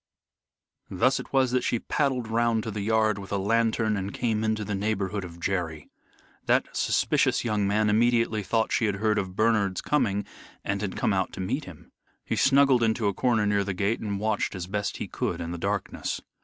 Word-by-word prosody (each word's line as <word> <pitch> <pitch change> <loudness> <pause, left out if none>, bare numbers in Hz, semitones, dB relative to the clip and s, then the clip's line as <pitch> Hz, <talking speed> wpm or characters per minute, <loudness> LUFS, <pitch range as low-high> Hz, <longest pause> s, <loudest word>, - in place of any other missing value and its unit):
Thus 130 +8 +2
it - - -9
was 130 -2 +3
that 125 0 +1
she 120 - +1
paddled 130 -1 -1
round 115 0 +1
to 110 - -4
the 105 0 -4
yard 110 -1 +2
with 95 - -9
a 100 - +1
lantern 110 +1 +1
and 100 0 -3
came 110 -1 -1
into 110 -1 0
the 105 - -3
neighborhood 100 -1 -1
of 85 -1 -9
Jerry. 85 -4 -3 0.6
That - - +1
suspicious - - +1
young 105 -3 +1
man 105 +2 +2
immediately 115 0 +2
thought 110 +3 0
she 115 - +2
had 100 -2 0
heard 105 +1 +1
of 95 -1 -4
Bernard's 105 -3 +2
coming 105 -9 +1 0.4
and 100 0 -1
had 100 -3 -4
come 105 - +1
out 95 -1 0
to - - -8
meet 125 +11 -2
him. 85 -4 -13 0.3
He - - -1
snuggled 135 -2 +4
into 110 -1 +1
a 100 - +1
corner 115 -1 +1
near 100 -1 +2
the 100 -1 -3
gate 100 +5 0
and 100 -2 -3
watched 110 -1 -1
as 90 -2 -4
best 100 +2 -3
he - - -4
could - - -3
in 85 0 -4
the 85 - -5
darkness. - - -2
105 Hz, 205 wpm, -26 LUFS, 100-115 Hz, 0.6 s, snuggled